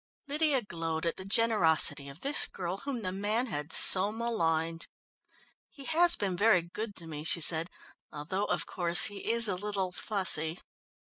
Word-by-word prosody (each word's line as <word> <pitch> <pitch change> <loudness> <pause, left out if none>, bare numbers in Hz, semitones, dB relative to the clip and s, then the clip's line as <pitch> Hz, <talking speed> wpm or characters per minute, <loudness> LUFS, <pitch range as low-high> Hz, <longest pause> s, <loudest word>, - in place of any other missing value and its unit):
Lydia 290 -3 0
glowed 165 -3 -4
at 165 - -2
the 190 - -9
generosity 190 -9 +2
of 140 +4 -14
this 285 +2 +3
girl 180 0 -6
whom 270 -2 -5
the 185 - -3
man 210 +5 -1
had 150 - -6
so 195 +2 +5
maligned. 165 -8 -2 0.8
"He 275 - -12
has 340 +3 +3
been 195 -3 -3
very 200 -2 +3
good 205 +5 -7
to 170 - -5
me," 150 -2 -8
she 170 - +4
said, 165 +1 +1 0.4
"although, 170 +7 -4
of - - -2
course, 175 -1 +3
he 205 +2 -3
is 230 -1 +1
a 200 - -1
little 195 -1 -4
fussy." 180 -5 -1
190 Hz, 165 wpm, -29 LUFS, 165-225 Hz, 0.8 s, so